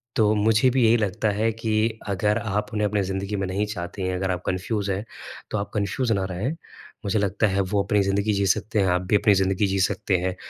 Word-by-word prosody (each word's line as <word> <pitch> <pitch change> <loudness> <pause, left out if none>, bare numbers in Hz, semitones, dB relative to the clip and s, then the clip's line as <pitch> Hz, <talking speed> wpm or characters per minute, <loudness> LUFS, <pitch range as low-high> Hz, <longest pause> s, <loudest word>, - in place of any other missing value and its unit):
तो 110 -1 +3
मुझे 110 +4 +3
भी 130 0 +2
यही 115 +2 +5
लगता 105 +1 0
है 110 +2 +1
कि 110 0 -1
अगर 105 +2 +1
आप 105 -2 -2
उन्हें 105 -1 +1
अपने 105 0 0
ज़िंदगी 95 +2 -3
में 95 -1 -2
नहीं 100 +3 -1
चाहती 95 -2 -6
हैं 95 0 -1
अगर 95 0 -1
आप 90 -1 -3
कन्फ्यूज 100 +2 -2
हैं 100 +3 -3 0.5
तो - - 0
आप 100 - -4
कन्फ्यूज 110 +4 -1
ना 100 -3 +1
रहें 100 +10 -2 0.5
मुझे 105 +2 +1
लगता 100 +2 +1
है 100 0 +1
वो 100 +1 0
अपनी 105 +1 +2
ज़िंदगी 100 +2 +1
जी 100 0 +1
सकते 105 +3 +1
हैं, 95 - +3
आप 90 0 +2
भी 90 +3 +1
अपनी 105 0 +4
ज़िंदगी 95 +1 +1
जी 95 0 -1
सकते 95 0 +1
हैं। 90 +1 -2
100 Hz, 235 wpm, -24 LUFS, 95-110 Hz, 0.5 s, यही